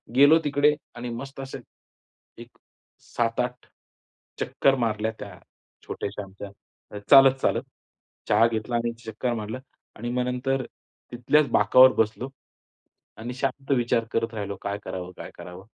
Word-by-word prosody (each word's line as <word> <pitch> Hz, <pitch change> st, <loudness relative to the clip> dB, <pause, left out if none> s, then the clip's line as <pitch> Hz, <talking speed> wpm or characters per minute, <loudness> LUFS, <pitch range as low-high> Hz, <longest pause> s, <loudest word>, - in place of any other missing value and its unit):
गेलो 145 Hz, +4 st, +7 dB
तिकडे 145 Hz, +1 st, +3 dB, 0.2 s
आणि 120 Hz, 0 st, -5 dB
मस्त 135 Hz, +4 st, -7 dB
असे 135 Hz, -, -7 dB, 0.8 s
एक -, -, -10 dB, 0.7 s
7-8 125 Hz, +2 st, -1 dB, 0.7 s
चक्कर 135 Hz, -1 st, +2 dB
मारल्या 110 Hz, 0 st, -1 dB
त्या 100 Hz, -3 st, -9 dB, 0.5 s
छोट्याश्या 105 Hz, -, -5 dB
आमच्या, 100 Hz, +1 st, -10 dB, 0.6 s
चालत-चालत. 135 Hz, -1 st, +6 dB, 0.7 s
चहा 115 Hz, -, +5 dB
घेतला 115 Hz, +1 st, -3 dB
आणि 120 Hz, 0 st, 0 dB
चक्कर 115 Hz, +3 st, -2 dB
मारलं. 110 Hz, +2 st, -5 dB, 0.4 s
आणि 120 Hz, +2 st, -5 dB
मग 125 Hz, 0 st, 0 dB
नंतर 130 Hz, +1 st, -1 dB, 0.5 s
तिथल्याच 135 Hz, +5 st, +2 dB
बाकावर 130 Hz, 0 st, +6 dB
बसलो 110 Hz, +4 st, 0 dB, 0.9 s
आणि 120 Hz, +3 st, -6 dB
शांत 135 Hz, +1 st, -3 dB
विचार 115 Hz, -1 st, +1 dB
करत 115 Hz, 0 st, -1 dB
राहिलो 100 Hz, -1 st, -4 dB
काय 100 Hz, 0 st, -3 dB
करावं, 90 Hz, 0 st, -6 dB
काय -, -, -8 dB
करावं? 90 Hz, +2 st, -11 dB
120 Hz, 125 wpm, -25 LUFS, 110-135 Hz, 0.9 s, गेलो